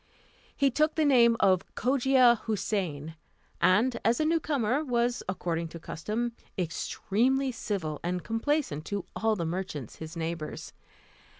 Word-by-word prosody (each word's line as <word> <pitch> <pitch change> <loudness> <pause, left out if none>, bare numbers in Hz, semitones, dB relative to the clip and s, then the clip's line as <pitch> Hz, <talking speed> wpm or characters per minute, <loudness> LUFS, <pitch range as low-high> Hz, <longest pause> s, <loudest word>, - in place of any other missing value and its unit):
He 275 -1 +3
took 305 +4 +2
the 315 - +2
name 235 -4 +5
of 185 -2 +4
Cogia 255 -1 +4
Houssain, 185 -8 -2 0.5
and, 235 +6 +3
as 230 +2 +2
a 310 - +2
new 330 +1 +3
comer, 280 -2 0
was, 245 -2 0
according 170 -3 -2
to 165 +1 -9
custom, 215 +9 -3 0.3
extremely 235 - 0
civil 185 - -3
and 180 +1 -2
complaisant 225 - -1
to 200 -3 -3
all 220 0 +1
the 170 -4 -2
merchants 160 - -4
his 160 +1 -8
neighbours. 165 -1 -5
215 Hz, 135 wpm, -29 LUFS, 170-255 Hz, 0.5 s, name